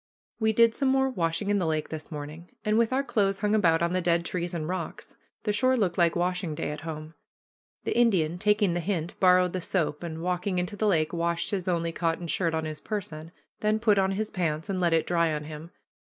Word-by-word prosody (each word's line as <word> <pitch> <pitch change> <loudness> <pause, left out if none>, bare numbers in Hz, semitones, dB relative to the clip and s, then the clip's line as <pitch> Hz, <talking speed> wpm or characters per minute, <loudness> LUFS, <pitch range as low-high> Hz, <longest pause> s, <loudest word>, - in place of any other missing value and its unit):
We 220 -1 +3
did 230 +1 +5
some 275 - 0
more 265 0 +2
washing 175 0 -1
in 205 - +2
the 175 - 0
lake 155 -1 -1
this 155 0 -7
morning, 150 +3 -7 0.2
and, 215 0 +2
with 230 +1 +3
our 265 +2 +1
clothes 200 -6 0
hung 210 0 +1
about 170 -6 +3
on 170 +1 0
the 185 - +1
dead 170 0 +1
trees 175 0 -3
and 155 -2 -3
rocks, 180 -2 -5 0.3
the 210 - 0
shore 255 +4 +3
looked 185 -7 +1
like 170 -1 +3
washing 180 -2 -1
day 150 - -3
at 150 0 -6
home. 155 0 -7 0.7
The - - -2
Indian, 180 -9 +2
taking 210 -2 +2
the 175 - 0
hint, 175 -2 -2
borrowed 180 -1 +4
the 185 - -2
soap, 165 -5 -1
and, 165 -1 -5
walking 180 +1 -1
into 180 +4 -2
the 215 +1 0
lake, 160 -5 +2
washed 170 +2 -1
his 190 -3 -2
only 170 -2 0
cotton 165 +1 -1
shirt 165 0 0
on 160 0 -1
his 155 -1 -6
person, 165 -7 -5 0.3
then 215 0 +2
put 215 -3 +3
on 190 0 +2
his 215 +2 -2
pants 165 -3 -2
and 185 -1 -2
let 175 -1 +3
it 160 -1 +2
dry 170 -2 +2
on 150 0 -3
him. 155 +2 -8
175 Hz, 230 wpm, -27 LUFS, 165-205 Hz, 0.7 s, did